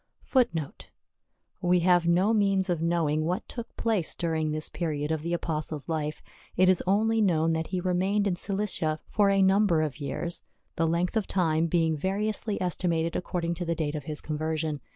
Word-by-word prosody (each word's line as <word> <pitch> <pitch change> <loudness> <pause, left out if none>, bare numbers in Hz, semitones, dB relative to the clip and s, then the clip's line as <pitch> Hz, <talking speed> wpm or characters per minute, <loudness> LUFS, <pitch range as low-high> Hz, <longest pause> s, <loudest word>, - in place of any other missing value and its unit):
We 180 0 +3
have 175 -1 +3
no 185 +6 +3
means 195 -3 +2
of 170 -2 -1
knowing 165 -2 +1
what 180 +6 -2
took 235 -2 -8
place 215 -8 0
during 160 -2 -1
this 155 0 0
period 150 -3 -3
of 160 -1 -1
the 170 +2 -3
Apostle's 155 -3 -2
life. 155 -2 -3 0.3
It 185 +1 +5
is 185 - +3
only 220 +3 +2
known 165 -5 +2
that 160 0 -2
he 185 - -2
remained 190 +3 +1
in 190 -3 +1
Cilicia 185 -5 -2
for 205 -2 +3
a 195 0 +4
number 190 -4 +3
of 150 -1 -4
years, 170 +4 -3 0.3
the 165 - +1
length 170 +5 0
of 220 -3 0
time 165 -3 +1
being 165 -1 +1
vari 195 +7 -1
ously 215 -1 -1
estimated 170 -2 0
according 170 -1 -2
to 175 +1 -4
the 170 -1 -1
date 150 -3 -2
of 150 -3 -5
his 150 -1 -2
conversion. 155 -1 -2
170 Hz, 180 wpm, -27 LUFS, 160-190 Hz, 0.3 s, It